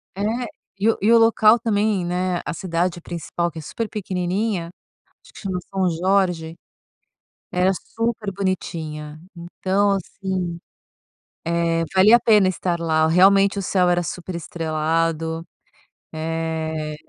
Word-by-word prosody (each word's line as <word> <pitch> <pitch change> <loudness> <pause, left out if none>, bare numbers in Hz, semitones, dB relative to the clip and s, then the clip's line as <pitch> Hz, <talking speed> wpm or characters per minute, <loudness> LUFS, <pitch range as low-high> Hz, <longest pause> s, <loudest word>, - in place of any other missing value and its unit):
É. 200 - -5 0.6
E 215 +3 +3
o - - +2
e 215 +3 +3
o - - +8
local 225 0 +5
também, 210 -4 +1
né, 180 0 -1
a 150 - -3
cidade 175 0 -1
principal 170 0 -3
que 160 - -8
é - - -7
super 225 +8 -4
pequenininha, 185 -1 -2 0.5
acho - - -19
que - - -12
chama 190 -3 -3
São 190 -2 +1
Jorge, 175 -2 0 1.0
era 185 +2 +2
super 225 -1 -3
bonitinha, 155 -5 -4 0.2
então, 190 +4 0
assim, 185 -2 -3 0.9
eh, 165 0 +1
valia 210 +5 +7
a - - -1
pena 210 -5 +5
estar 175 -1 -2
lá, 160 -1 +2
realmente 195 +4 +5
o - - -2
céu 180 -1 +2
era 175 0 +2
super 175 +3 -6
estrelado, 165 0 -1 0.7
eh, 160 -1 -3
180 Hz, 135 wpm, -22 LUFS, 165-195 Hz, 1.0 s, o